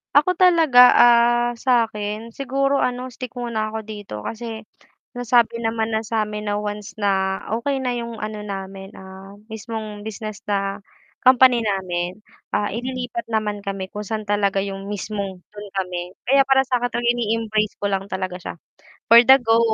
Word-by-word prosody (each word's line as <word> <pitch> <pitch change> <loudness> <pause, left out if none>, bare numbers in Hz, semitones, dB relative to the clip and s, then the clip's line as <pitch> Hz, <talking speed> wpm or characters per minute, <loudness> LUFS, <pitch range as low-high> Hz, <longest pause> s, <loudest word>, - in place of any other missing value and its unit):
Ako 335 +6 +4
talaga, 335 -8 +5
ah, 240 0 +5
sa 240 -1 +2
akin 215 +2 -6
siguro 275 +1 0
ano 250 +1 -2
stick 255 0 -8
muna 220 -3 -2
ako 220 - -3
dito 205 - -8
kasi 225 -1 -6 0.6
nasabi 235 -1 +2
naman 225 0 0
na 220 - -1
sa 220 -1 -1
amin 210 0 -4
na 205 - 0
once 210 -1 -6
na 190 -1 +1 0.2
okey 270 +4 -1
na 250 -2 -1
'yong 235 -2 -5
ano 215 0 -5
namin, 195 -1 -7
ah, 190 +1 -12
mismong 220 -1 -7
business 215 -1 -7
na 195 0 -2 0.4
company 255 -2 +6
namin, 185 -3 -2 0.3
ah, 205 - 0
ililipat 245 -1 -4
naman 210 -2 -1
kami 195 -1 -4
kung 210 +2 -7
saan 215 +1 -4
talaga 200 -1 +1
yung 195 0 -5
mismong 200 -2 -4
dun 205 0 -10
kami, 180 -1 -4 0.2
kaya 275 +2 +5
para 270 0 +4
sa 250 -1 0
akin 240 0 -1
ini-embrace 220 -2 -1
ko 205 - -1
lang 195 0 -2
talaga 185 -1 -3
siya, - - -6 0.6
for 230 - +11
the 265 - +10
go. 225 0 +4
215 Hz, 165 wpm, -22 LUFS, 200-240 Hz, 0.6 s, for